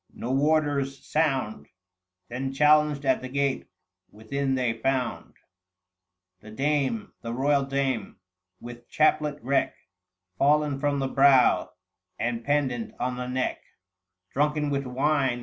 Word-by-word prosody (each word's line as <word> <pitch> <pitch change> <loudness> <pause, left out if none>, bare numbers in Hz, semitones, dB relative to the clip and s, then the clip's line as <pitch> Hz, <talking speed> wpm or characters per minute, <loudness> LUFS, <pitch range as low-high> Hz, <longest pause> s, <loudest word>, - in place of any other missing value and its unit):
No 120 - -4
warder's 140 -1 0
sound 135 - -1 0.6
Them 130 +4 -4
challenged 150 0 +3
at 130 -1 +2
the 130 - -6
gate: 140 0 -1 0.4
within 135 +6 -3
they 125 -3 0
found 125 +2 -2 1.0
The 110 - -13
dame, 135 -2 -1
the 115 - -5
royal 140 +1 +2
dame, 135 -7 -2 0.4
with 120 0 -11
chaplet 150 -1 +2
wreck 135 +2 0 0.6
Fallen 145 0 +2
from 145 0 0
the 135 -1 -1
brow 135 -1 +4 0.4
and 115 0 -2
pendent 135 -5 -1
on 125 0 -1
the 125 0 -4
neck, 130 +1 -2 0.7
Drunken 150 +1 0
with 140 -1 -2
wine. 135 -1 +1
135 Hz, 120 wpm, -26 LUFS, 125-145 Hz, 1.0 s, brow